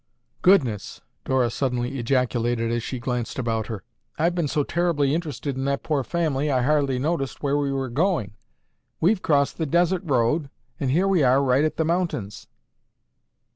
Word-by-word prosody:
"Goodness!" 135 Hz, -, +2 dB, 0.2 s
Dora 130 Hz, -3 st, +1 dB
suddenly 125 Hz, +1 st, -2 dB
ejaculated 120 Hz, -2 st, 0 dB
as 120 Hz, 0 st, 0 dB
she 130 Hz, -, -4 dB
glanced 120 Hz, -1 st, -3 dB
about 115 Hz, -3 st, -1 dB
her. 110 Hz, -5 st, -6 dB, 0.3 s
"I've 170 Hz, +3 st, +2 dB
been 170 Hz, -3 st, 0 dB
so 145 Hz, +1 st, 0 dB
terribly 150 Hz, -4 st, +1 dB
interested 150 Hz, -4 st, -3 dB
in 135 Hz, +1 st, -3 dB
that 140 Hz, 0 st, -1 dB
poor 145 Hz, -4 st, 0 dB
family, 150 Hz, -2 st, -1 dB
I 130 Hz, -3 st, +1 dB
hardly 140 Hz, -2 st, +2 dB
noticed 140 Hz, 0 st, -2 dB
where 140 Hz, 0 st, +1 dB
we 145 Hz, -1 st, 0 dB
were 135 Hz, -1 st, -2 dB
going. 135 Hz, -, 0 dB, 0.7 s
We've 185 Hz, +4 st, +2 dB
crossed 140 Hz, 0 st, +1 dB
the 160 Hz, -, 0 dB
desert 175 Hz, +4 st, +2 dB
road 140 Hz, 0 st, +1 dB, 0.3 s
and 135 Hz, -, -1 dB
here 175 Hz, +9 st, +2 dB
we 190 Hz, -4 st, +3 dB
are 135 Hz, +1 st, +4 dB
right 130 Hz, +2 st, +3 dB
at 155 Hz, -, -1 dB
the 160 Hz, -, +1 dB
mountains." 165 Hz, -, -2 dB
140 Hz, 170 wpm, -24 LUFS, 125-160 Hz, 0.7 s, are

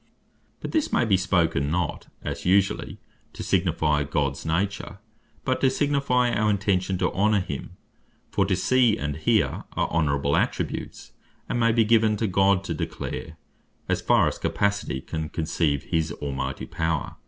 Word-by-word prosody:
But -, -, -5 dB
this 315 Hz, -3 st, 0 dB
may -, -, +2 dB
be 105 Hz, -4 st, +3 dB
spoken, 85 Hz, -7 st, +1 dB
not 85 Hz, -1 st, -2 dB, 0.2 s
(as -, -, -4 dB
usually) 95 Hz, +2 st, +1 dB, 0.4 s
to -, -, -6 dB
signifie 80 Hz, -5 st, +1 dB
Gods 70 Hz, 0 st, -2 dB
nature, 95 Hz, +4 st, -2 dB, 0.5 s
but 130 Hz, -1 st, 0 dB
to 135 Hz, -, +5 dB
signifie 130 Hz, -3 st, +1 dB
our 105 Hz, 0 st, +2 dB
intention 95 Hz, -2 st, +1 dB
to 90 Hz, 0 st, 0 dB
honor 105 Hz, +3 st, +3 dB
him. 75 Hz, -7 st, -6 dB, 0.5 s
For 100 Hz, -, +2 dB
to 95 Hz, -, +2 dB
See, 125 Hz, +2 st, +3 dB
and 75 Hz, 0 st, -3 dB
Hear, 80 Hz, -, +1 dB
are -, -, 0 dB
Honorable 70 Hz, -3 st, +1 dB
Attributes, -, -, -2 dB, 0.4 s
and 120 Hz, -, -1 dB
may 115 Hz, 0 st, +4 dB
be 115 Hz, -1 st, +3 dB
given 110 Hz, -1 st, +3 dB
to 110 Hz, -, 0 dB
God, 95 Hz, 0 st, +3 dB
to 85 Hz, -, -3 dB
declare 75 Hz, -, -5 dB, 0.5 s
(as -, -, 0 dB
far -, -, +4 dB
as -, -, -2 dB
our -, -, -22 dB
capacity 100 Hz, -9 st, -1 dB
can 80 Hz, +1 st, -4 dB
conceive) 80 Hz, -3 st, 0 dB
his 80 Hz, -2 st, -1 dB
Almighty 70 Hz, -2 st, -4 dB
power. 80 Hz, -2 st, -2 dB
95 Hz, 160 wpm, -25 LUFS, 80-105 Hz, 0.5 s, to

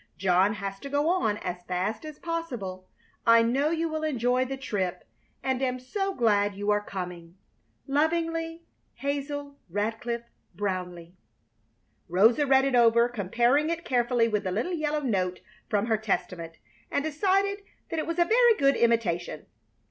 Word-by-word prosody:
John 190 Hz, +2 st, +3 dB
has 195 Hz, -2 st, -5 dB
to 280 Hz, -, -7 dB
go 290 Hz, +3 st, +1 dB
on 280 Hz, -, +1 dB
as 180 Hz, 0 st, -4 dB
fast 190 Hz, -, -2 dB
as 305 Hz, -1 st, -8 dB
possible. 245 Hz, -, -5 dB, 0.4 s
I 230 Hz, 0 st, +7 dB
know 270 Hz, +6 st, +2 dB
you 330 Hz, 0 st, 0 dB
will 315 Hz, -1 st, -3 dB
enjoy 255 Hz, -4 st, +1 dB
the 270 Hz, +1 st, -4 dB
trip, 190 Hz, -9 st, -3 dB, 0.4 s
and 265 Hz, -1 st, 0 dB
am 255 Hz, -1 st, 0 dB
so 390 Hz, +10 st, -3 dB
glad 205 Hz, -4 st, +2 dB
you 205 Hz, +1 st, 0 dB
are 205 Hz, 0 st, +1 dB
coming. 180 Hz, -3 st, -7 dB, 0.5 s
Lovingly, 330 Hz, +3 st, 0 dB, 0.3 s
HAZEL 285 Hz, 0 st, -4 dB
RADCLIFFE 225 Hz, +5 st, -2 dB, 0.3 s
BROWNLEIGH. 180 Hz, -4 st, -4 dB, 1.0 s
Rosa 225 Hz, -, +4 dB
read 265 Hz, 0 st, +5 dB
it 275 Hz, -, 0 dB
over, 235 Hz, -1 st, +5 dB
comparing 240 Hz, -, +1 dB
it 335 Hz, 0 st, -3 dB
carefully 240 Hz, -2 st, +2 dB
with 210 Hz, -2 st, -1 dB
the 185 Hz, -, -2 dB
little 230 Hz, -, -1 dB
yellow 305 Hz, -2 st, -1 dB
note 185 Hz, -8 st, -1 dB, 0.3 s
from 205 Hz, -1 st, +1 dB
her 225 Hz, -2 st, +1 dB
Testament, 180 Hz, -5 st, -3 dB, 0.4 s
and 285 Hz, -, 0 dB
decided 390 Hz, +6 st, +1 dB, 0.3 s
that 330 Hz, -, -1 dB
it 310 Hz, -, -3 dB
was 335 Hz, 0 st, -2 dB
a 345 Hz, -, +4 dB
very 470 Hz, +3 st, +5 dB
good 275 Hz, 0 st, +4 dB
imitation. 180 Hz, -9 st, 0 dB
240 Hz, 155 wpm, -27 LUFS, 200-300 Hz, 1.0 s, I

